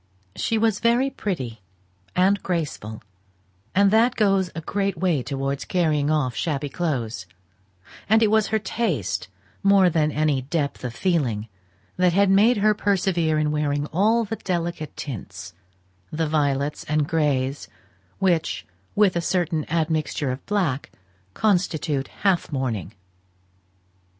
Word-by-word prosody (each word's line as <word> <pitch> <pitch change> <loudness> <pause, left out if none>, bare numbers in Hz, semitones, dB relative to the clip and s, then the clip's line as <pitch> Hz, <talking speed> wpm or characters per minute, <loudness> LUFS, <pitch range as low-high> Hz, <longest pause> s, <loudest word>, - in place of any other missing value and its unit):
She 225 - 0
was 220 -2 +2
very 240 +4 +2
pretty 130 - -4 0.5
and 195 +2 +3
graceful; 145 - -3 0.7
and 200 0 +5
that 230 +3 +4
goes 195 -4 +2
a 165 - -4
great 195 +2 -1
way 165 -5 +1
towards 135 +1 -3
carrying 155 -5 +1
off 150 -5 +1
shabby 145 -3 -2
clothes; 125 - -3 0.8
and 220 +1 +5
it 215 - +3
was 220 -1 +3
her 220 - +1
taste 190 - -2 0.3
more 195 -2 +5
than 155 -1 +2
any 150 -3 +1
depth 140 +1 -2
of 120 -2 -4
feeling, 120 - 0 0.5
that 180 -1 +3
had 200 +1 +4
made 215 +5 +5
her 215 +1 +4
persevere 180 -6 +1
in 150 -1 +1
wearing 145 -1 0
all 220 +6 +3
the 225 +1 -4
delicate 170 -4 -3
tints 100 -7 -7 0.6
the 160 +1 -1
violets 145 -1 0
and 150 -1 0
grays 145 -4 0 0.5
which, 175 -4 0 0.3
with 205 -3 +4
a 170 - +1
certain 170 -3 -1
admixture 155 -4 0
of 130 - -6
black, 180 -10 0 0.5
constitute 170 -8 0
half 190 -5 0
mourning. 115 - -3
160 Hz, 130 wpm, -24 LUFS, 140-195 Hz, 0.8 s, and